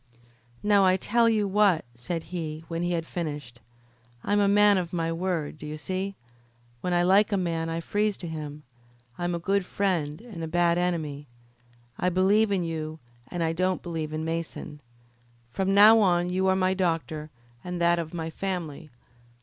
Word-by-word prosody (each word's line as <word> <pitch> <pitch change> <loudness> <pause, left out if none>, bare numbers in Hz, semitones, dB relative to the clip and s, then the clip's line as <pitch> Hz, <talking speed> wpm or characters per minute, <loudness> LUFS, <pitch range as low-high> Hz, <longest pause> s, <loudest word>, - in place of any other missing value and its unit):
"Now, 205 -2 +5
I'll 185 0 +4
tell 230 +4 +3
you 215 -2 +1
what," 195 -6 +3
said 160 +8 -4
he, 160 -2 -4
when 165 0 -3
he 175 0 0
had 165 -1 -1
finished. 145 -9 -5 0.6
"I'm 205 0 +2
a 200 - +4
man 205 -1 +5
of 175 -1 -5
my 165 -1 -1
word, 165 -3 -2
d'ye 150 0 -6
see? 185 +5 -4 0.6
When 180 - -3
I 175 0 +3
like 200 +4 +4
a 200 - +2
man 165 -3 -1
I 165 0 -2
freeze 205 +3 0
to 175 - -7
him. 150 -2 -6 0.6
I'm 175 0 -1
a - - -3
good 195 +3 +1
friend 175 -6 -1
and 215 -8 -8
a - - -3
bad 170 +1 +2
enemy. 155 -5 -2 0.7
I 180 - +2
believe 200 +4 +3
in 190 -3 +1
you, 160 -1 -4 0.3
and 175 -1 -3
I 165 0 0
don't 185 +2 0
believe 160 -3 -4
in 155 +1 -3
Mason. 165 -2 -4 0.7
From 190 +8 0
now 215 +3 +8
on 180 -3 +2
you 190 +1 +1
are 190 - +4
my 185 0 +2
doctor, 165 -4 -2 0.3
and 180 -1 -4
that 170 0 +3
of 160 -1 -4
my 165 -2 -4
family. 170 -4 -4
175 Hz, 180 wpm, -27 LUFS, 160-190 Hz, 0.7 s, now